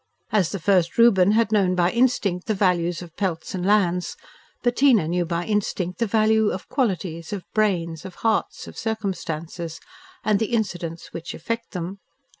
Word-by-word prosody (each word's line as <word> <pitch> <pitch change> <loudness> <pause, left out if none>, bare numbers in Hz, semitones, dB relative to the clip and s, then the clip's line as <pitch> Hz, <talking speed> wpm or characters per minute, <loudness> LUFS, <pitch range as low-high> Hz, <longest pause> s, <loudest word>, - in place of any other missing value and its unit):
As 200 -6 +2
the 200 - -2
first 180 -1 +2
Reuben 205 -4 +6
had 225 0 +2
known 190 -4 +3
by 175 0 +2
instinct 235 -7 +1
the 215 - +1
values 175 -3 +1
of 165 -2 -13
pelts 185 -2 -2
and 185 -2 -3
lands, 180 -3 +2 0.5
Bettina 245 - +4
knew 175 +1 0
by 170 +1 -2
instinct 195 -3 -1
the 230 - +1
values 220 0 +3
of 185 - -6
qualities, 185 - -1
of 200 -3 -4
brains, 170 -7 0
of 190 -2 -9
hearts, 220 -1 0
of - - -10
circumstances, 170 -6 -4 0.4
and 210 -2 +2
the 225 +2 -2
incidents 175 -7 -3
which 165 0 -6
affect 230 +8 -4
them. 180 +2 -5
190 Hz, 165 wpm, -23 LUFS, 175-215 Hz, 0.5 s, Reuben